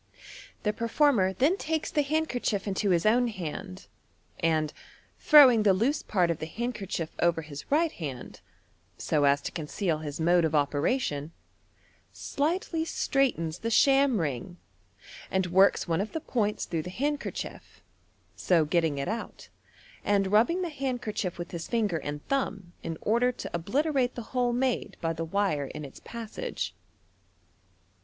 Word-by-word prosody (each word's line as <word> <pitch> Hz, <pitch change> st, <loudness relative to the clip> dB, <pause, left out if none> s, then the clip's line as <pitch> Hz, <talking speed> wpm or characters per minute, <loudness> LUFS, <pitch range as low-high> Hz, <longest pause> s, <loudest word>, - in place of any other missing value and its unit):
The 210 Hz, -, +1 dB
per 230 Hz, +2 st, -3 dB
former 230 Hz, -8 st, +3 dB
then 285 Hz, -, +2 dB
takes 320 Hz, -4 st, -2 dB
the 295 Hz, -, +2 dB
handkerchitf 275 Hz, -9 st, -1 dB
into 200 Hz, 0 st, -1 dB
his 175 Hz, 0 st, +2 dB
own 240 Hz, +3 st, +4 dB
hand, 185 Hz, -1 st, -6 dB, 0.5 s
and, 155 Hz, -2 st, +1 dB, 0.5 s
throwing 265 Hz, -7 st, +8 dB
the 200 Hz, -3 st, +4 dB
loose 260 Hz, +10 st, +1 dB
part 180 Hz, -4 st, +1 dB
of 165 Hz, -, -3 dB
the 155 Hz, -, -4 dB
handkerchief 200 Hz, -5 st, -4 dB
over 170 Hz, -1 st, +2 dB
his 145 Hz, -2 st, -9 dB
right 320 Hz, +2 st, +3 dB
hand, 135 Hz, -7 st, -7 dB, 0.6 s
so 150 Hz, -2 st, +1 dB
as 140 Hz, 0 st, +4 dB
to -, -, -4 dB
con 155 Hz, -3 st, -5 dB
ceal 165 Hz, -3 st, -1 dB
his 145 Hz, 0 st, -5 dB
mode 170 Hz, +1 st, +4 dB
of 160 Hz, -1 st, +1 dB
operation, 145 Hz, -, 0 dB, 0.8 s
slightly 325 Hz, +2 st, -1 dB
straighten* 275 Hz, -, 0 dB
the 230 Hz, -, -1 dB
sham 270 Hz, 0 st, +4 dB
ring, 160 Hz, +3 st, -3 dB, 0.7 s
and 190 Hz, -1 st, +1 dB
works 190 Hz, +3 st, +4 dB
one 165 Hz, +1 st, +1 dB
of 215 Hz, -, -5 dB
the 320 Hz, -, -1 dB
points 215 Hz, -8 st, -1 dB
through 165 Hz, -2 st, -2 dB
the 180 Hz, -, -7 dB
handkerchief, 285 Hz, +8 st, -4 dB, 0.5 s
so 170 Hz, -4 st, +2 dB
getting 160 Hz, -2 st, +1 dB
it 140 Hz, -, -2 dB
out, 225 Hz, +4 st, -5 dB, 0.5 s
and 200 Hz, -1 st, +2 dB
nibbing 290 Hz, -, +3 dB
the 350 Hz, -, -2 dB
handkerchief 245 Hz, -, -3 dB
with 175 Hz, 0 st, -6 dB
his 170 Hz, -2 st, -5 dB
finger 215 Hz, -7 st, 0 dB
and 145 Hz, -1 st, -6 dB
thumb 200 Hz, -10 st, -2 dB
in 165 Hz, -1 st, -5 dB
order 235 Hz, +3 st, +2 dB
to -, -, -7 dB
obliterate 255 Hz, -, 0 dB
the 240 Hz, -, -5 dB
hole 245 Hz, -1 st, +2 dB
made 250 Hz, 0 st, -1 dB
by 165 Hz, 0 st, -1 dB
the 165 Hz, 0 st, -4 dB
wire 165 Hz, -5 st, 0 dB
in 150 Hz, +2 st, -7 dB
its 135 Hz, -, -12 dB
passage. 235 Hz, -, -5 dB
200 Hz, 155 wpm, -28 LUFS, 165-250 Hz, 0.8 s, throwing